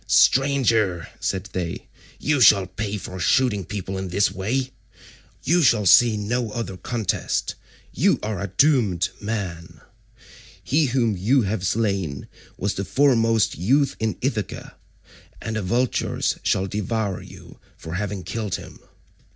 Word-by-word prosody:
"Stranger," 115 - +3
said 95 0 -3
they, 90 -2 -4 0.3
"you 145 -2 0
shall 100 -4 +7
pay 100 +3 -4
for 95 -1 -8
shooting 105 +2 +2
people 95 0 -5
in 95 - -4
this 95 +3 +1
way: 120 +8 -2 0.7
you 175 +5 +3
shall 115 -7 +3
see 115 +4 +6
no 115 +3 -2
other 115 -5 -4
contest; 110 +1 -2 0.4
you - - +3
are 105 -3 -3
a 100 - -2
doomed 105 - +2
man; 95 -6 -5 0.8
he 145 +2 +2
whom 120 -4 +1
you 115 +8 +2
have 95 -2 -2
slain 95 -9 -1 0.3
was 100 +1 -1
the 100 - -3
foremost 115 -5 +2
youth 135 - +2
in 110 -4 -1
Ithaca, - - -3 0.6
and 110 - -5
the 110 - -1
vultures 120 +6 0
shall 95 - +1
devour 105 0 -2
you - - -14 0.2
for 80 - -8
having 100 0 -3
killed 105 -5 -3
him." - - -10
105 Hz, 135 wpm, -23 LUFS, 95-120 Hz, 0.8 s, shall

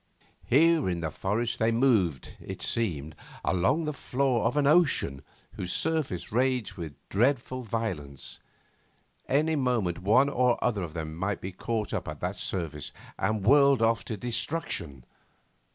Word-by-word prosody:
Here 160 - +4
in 85 -1 -2
the 80 -1 -2
forest 110 +7 -1
they 115 +1 +3
moved, 110 - +2
it - - -7
seemed, 80 -10 -1 0.3
along 130 - +2
the 150 - -2
floor 130 -4 0
of 125 +5 +1
an 145 - +3
ocean 145 - +3 0.3
whose 90 -1 -5
surface 155 - -1
raged 125 0 +1
with 80 -5 -7
dreadful 130 +3 +1
violence; 95 - -4 0.9
any 155 +4 +2
moment 120 - 0
one 110 +9 +4
or 125 -3 +2
other 110 -5 +1
of 85 -2 -6
them 80 -1 -4
might 95 +3 -2
be 95 - -5
caught 110 +3 -3
up - - -2
to 75 -1 -6
that 90 +2 -2
surface 80 -5 -4 0.3
and 105 +1 0
whirled 140 -1 +5
off 115 0 +2
to 110 - -4
destruction. 110 - -3
115 Hz, 150 wpm, -28 LUFS, 90-130 Hz, 0.9 s, whirled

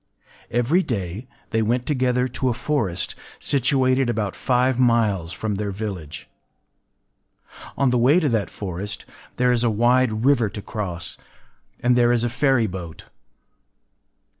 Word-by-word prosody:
Every 120 +10 +2
day 105 - -4 0.2
they 115 - +1
went 120 +3 0
together 125 -3 +1
to 130 +1 -1
a 120 - -1
forest 120 - -1 0.3
situated 130 -1 +2
about 110 -4 -2
five 125 0 +1
miles 110 -9 +2
from 110 +2 -3
their 100 +1 -2
village. 95 -7 -6 1.5
On 135 -2 +3
the 125 - +2
way 135 +9 +5
to 160 - +1
that 110 -4 0
forest 100 +1 -6 0.3
there 125 0 +3
is 120 -1 +1
a 120 - +3
wide 120 +1 +2
river 130 -6 +3
to 105 - -7
cross; 90 -6 -5 0.6
and 125 0 +3
there 120 -1 +4
is 120 -1 +2
a 120 - +1
ferry 130 -1 +2
boat. 90 -5 -7
120 Hz, 140 wpm, -23 LUFS, 105-125 Hz, 1.5 s, way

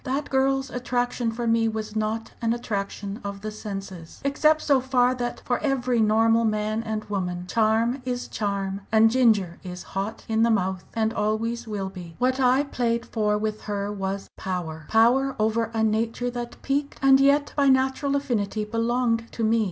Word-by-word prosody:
"That 275 +2 -2
girl's 270 0 +1
attraction 245 -1 -1
for 235 +1 -4
me 230 0 +3
was 215 -1 -4
not 220 +1 -2
an 230 0 +1
attraction 205 -2 -4
of 200 0 -5
the 215 +1 -4
senses 195 -5 -7
except 305 +2 +3
so 275 -3 +3
far 250 -1 +2
that 240 -1 -4
for 245 - 0
every 255 -4 0
normal 225 +2 +4
man 215 0 0
and 220 -1 -4
woman 180 -3 -3
charm 225 +5 +1
is 250 -1 -3
charm, 200 -2 -2
and 220 0 +5
ginger 220 -8 +3
is 180 -1 -7
hot 195 +3 -5
in 220 0 +1
the 230 - +4
mouth 190 -4 0
and 220 0 +1
always 225 +2 -1
will 200 -3 -3
be! 175 -3 -10
What 255 +2 +1
I 260 +2 +4
played 235 -4 -1
for 210 -2 0
with 215 0 -3
her 205 -1 -2
was 195 0 -4
power 160 -4 -4
power 250 +5 +4
over 220 +1 +1
a 225 -1 0
nature 225 +3 0
that 240 -1 -6
piqued 280 +1 -1
and 270 0 +7
yet 280 +1 +3
by 280 -1 +3
natural 265 +2 +2
affinity 220 -6 -1
belonged 230 +1 0
to 230 - -3
me. 225 +1 +3
225 Hz, 175 wpm, -25 LUFS, 210-250 Hz, -, and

